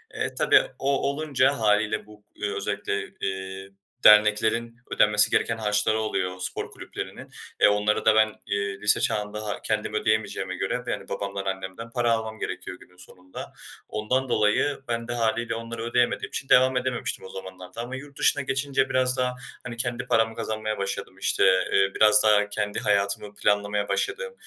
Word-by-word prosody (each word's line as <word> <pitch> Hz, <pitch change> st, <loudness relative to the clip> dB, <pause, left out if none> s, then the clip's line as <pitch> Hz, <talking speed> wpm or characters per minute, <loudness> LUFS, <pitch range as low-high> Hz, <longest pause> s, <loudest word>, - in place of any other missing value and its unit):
Eee, -, -, -3 dB
tabii -, -, +5 dB, 0.2 s
o 140 Hz, 0 st, +1 dB
olunca 140 Hz, -3 st, +1 dB
hâliyle 105 Hz, 0 st, +2 dB
bu, 105 Hz, -1 st, -17 dB
eee, 410 Hz, -, -3 dB
özellikle, 420 Hz, 0 st, -3 dB
eee, 95 Hz, 0 st, -4 dB, 0.3 s
derneklerin 105 Hz, +2 st, +5 dB, 0.2 s
ödenmesi 105 Hz, 0 st, +4 dB
gereken 115 Hz, -, +1 dB
harçları 105 Hz, 0 st, +1 dB
oluyor 90 Hz, -4 st, -2 dB
spor 90 Hz, -, -4 dB
kulüplerinin, -, -, -8 dB, 0.3 s
eee, -, -, +8 dB
onları 105 Hz, +1 st, +1 dB
da 110 Hz, 0 st, +5 dB
ben, 110 Hz, -1 st, +4 dB
eee, 100 Hz, -1 st, -2 dB
lise 105 Hz, -, +3 dB
çağında 105 Hz, 0 st, -1 dB
ha 105 Hz, -, -4 dB
kendim 105 Hz, -1 st, -2 dB
ödeyemeyeceğime 110 Hz, -1 st, 0 dB
göre -, -, -2 dB
ve, -, -, -2 dB
yani, -, -, -5 dB
babamdan, 100 Hz, -1 st, -4 dB
annemden 95 Hz, +4 st, -5 dB
para 120 Hz, -1 st, +1 dB
almam 110 Hz, -1 st, -2 dB
gerekiyor 90 Hz, -, -5 dB
günün 90 Hz, -, -19 dB
sonunda. 90 Hz, 0 st, -11 dB, 0.4 s
Ondan 125 Hz, +5 st, -1 dB
dolayı 110 Hz, +6 st, +2 dB
ben 115 Hz, 0 st, -2 dB
de 120 Hz, -, -3 dB
hâliyle 115 Hz, 0 st, 0 dB
onları 115 Hz, 0 st, -6 dB
ödeyemediğim 120 Hz, +1 st, +1 dB
için 135 Hz, -, -5 dB
devam 130 Hz, 0 st, +5 dB
edememiştim 125 Hz, -5 st, -3 dB
o -, -, -9 dB
zamanlarda 95 Hz, +2 st, -8 dB
ama 125 Hz, +2 st, -5 dB
yurt 140 Hz, +1 st, -10 dB
dışına 145 Hz, -, +3 dB
geçince 135 Hz, 0 st, 0 dB
biraz 130 Hz, 0 st, +1 dB
daha, 125 Hz, 0 st, 0 dB, 0.3 s
hani, 120 Hz, -1 st, -6 dB
kendi 120 Hz, 0 st, -2 dB
paramı 115 Hz, -1 st, +2 dB
kazanmaya 110 Hz, -1 st, -3 dB
başladım, 100 Hz, 0 st, -4 dB
işte, -, -, +1 dB, 0.3 s
eee, 95 Hz, 0 st, +4 dB
biraz 105 Hz, 0 st, +6 dB
daha 105 Hz, -1 st, +4 dB
kendi 105 Hz, 0 st, -2 dB
hayatımı 100 Hz, 0 st, 0 dB
planlamaya 105 Hz, 0 st, +1 dB
başladım, 475 Hz, +4 st, -2 dB
110 Hz, 165 wpm, -25 LUFS, 105-120 Hz, 0.4 s, eee